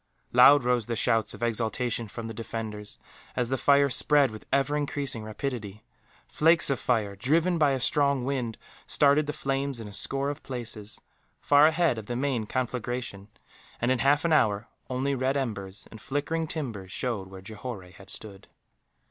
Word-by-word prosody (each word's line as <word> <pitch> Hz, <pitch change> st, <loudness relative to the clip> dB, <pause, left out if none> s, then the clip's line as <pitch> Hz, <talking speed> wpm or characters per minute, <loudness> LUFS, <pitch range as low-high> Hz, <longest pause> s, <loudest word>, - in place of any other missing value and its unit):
Loud 135 Hz, +3 st, +7 dB
rose 125 Hz, -3 st, +1 dB
the 120 Hz, -, -2 dB
shouts 115 Hz, 0 st, +1 dB
of -, -, -7 dB
exultation 115 Hz, 0 st, -1 dB
from 115 Hz, +3 st, -7 dB
the 115 Hz, -, -6 dB
defenders, 110 Hz, -2 st, -5 dB, 0.4 s
as 120 Hz, -1 st, -1 dB
the 135 Hz, -, +1 dB
fire 140 Hz, 0 st, +5 dB
spread 140 Hz, 0 st, +4 dB
with 110 Hz, -, -11 dB
ever 140 Hz, +1 st, +2 dB
increasing 140 Hz, -5 st, -2 dB
rapidity; 110 Hz, -2 st, -5 dB, 0.4 s
flakes 165 Hz, -1 st, +4 dB
of 135 Hz, -, 0 dB
fire, 110 Hz, -5 st, 0 dB
driven 165 Hz, -, +1 dB
by 150 Hz, -2 st, +4 dB
a 135 Hz, -1 st, 0 dB
strong 140 Hz, -2 st, +2 dB
wind, 125 Hz, -5 st, -2 dB, 0.3 s
started 145 Hz, +1 st, +3 dB
the -, -, -1 dB
flames 135 Hz, -3 st, -2 dB
in 110 Hz, -, -7 dB
a 100 Hz, -, -10 dB
score 135 Hz, +7 st, -1 dB
of 145 Hz, -, -9 dB
places, 115 Hz, -4 st, -5 dB, 0.4 s
far 145 Hz, +1 st, +6 dB
ahead 160 Hz, -6 st, +2 dB
of 105 Hz, -, -10 dB
the 120 Hz, -, -3 dB
main 125 Hz, -4 st, -1 dB
conflagration 120 Hz, -5 st, -3 dB, 0.5 s
and, 120 Hz, +2 st, +1 dB
in 130 Hz, -, +1 dB
half 145 Hz, +3 st, +3 dB
an 165 Hz, -, +3 dB
hour, 105 Hz, -5 st, +2 dB, 0.2 s
only 130 Hz, +2 st, -1 dB
red 135 Hz, +1 st, 0 dB
embers 100 Hz, -7 st, -4 dB
and 110 Hz, -, -11 dB
flickering 160 Hz, +4 st, -2 dB
timbers 115 Hz, -, -5 dB
showed 110 Hz, -6 st, -3 dB
where 95 Hz, 0 st, -11 dB
Johore 110 Hz, 0 st, -7 dB
had 100 Hz, +1 st, -15 dB
stood. 100 Hz, -2 st, -8 dB
125 Hz, 175 wpm, -27 LUFS, 110-140 Hz, 0.5 s, Loud